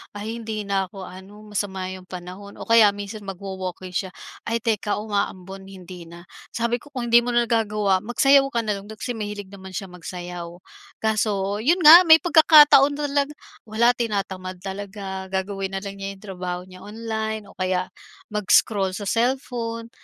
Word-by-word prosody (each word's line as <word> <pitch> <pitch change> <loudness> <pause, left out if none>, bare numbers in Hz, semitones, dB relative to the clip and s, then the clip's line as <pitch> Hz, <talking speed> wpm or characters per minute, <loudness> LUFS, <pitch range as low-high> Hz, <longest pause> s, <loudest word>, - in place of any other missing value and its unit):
"Ay 220 +3 -5
hindi 220 -2 -4
na 195 -1 0
ako 195 +1 -10
ano, 190 +3 -12
masama 190 -2 -3
'yong 185 -1 -9
panahon" 185 +3 -9
o - - -8
kaya 230 -2 +7
minsan 205 +1 -7
magwo-walking 185 -1 -6
siya, 185 0 -3 0.3
"ay 230 0 -1
teka 215 -2 0
umaambon 195 -2 -4
hindi 185 -2 -11
na." 170 +1 -12 0.3
Sabi 235 +1 0
ko 290 - -18
kung 245 -3 -4
hindi 235 - +8
mo 240 0 -3
na 240 - +4
nagagawa 210 -4 +1
magsayaw 270 +6 +4
ka 235 - +1
na 210 -2 -1
lang 195 - -13
dati 220 0 -10
kasi 245 - -2
mahilig 205 -2 -6
naman 190 -1 -11
siya 195 +1 -5
magsayaw, 175 0 -7 0.6
kaso 205 -2 0
'yon 335 +11 +2
nga 335 +4 +10
may 320 - +10
pagkakataon 300 -4 +7
na 295 - -5
talaga 285 +1 0 0.3
wala 230 +3 +3
tinatamad 195 -6 -4
talaga, 195 -1 -6
gagawin 195 0 -3
na 195 - -3
lang 200 -1 -7
niya 195 0 -5
yung 195 - -20
trabaho 180 -3 -5
niya 185 0 -14
online 220 0 -4
o - - -17
kaya 185 0 -1 0.4
mag-scroll 200 -1 +2
sa 205 - -6
cellphone 235 -1 -2
205 Hz, 175 wpm, -23 LUFS, 190-230 Hz, 0.6 s, nga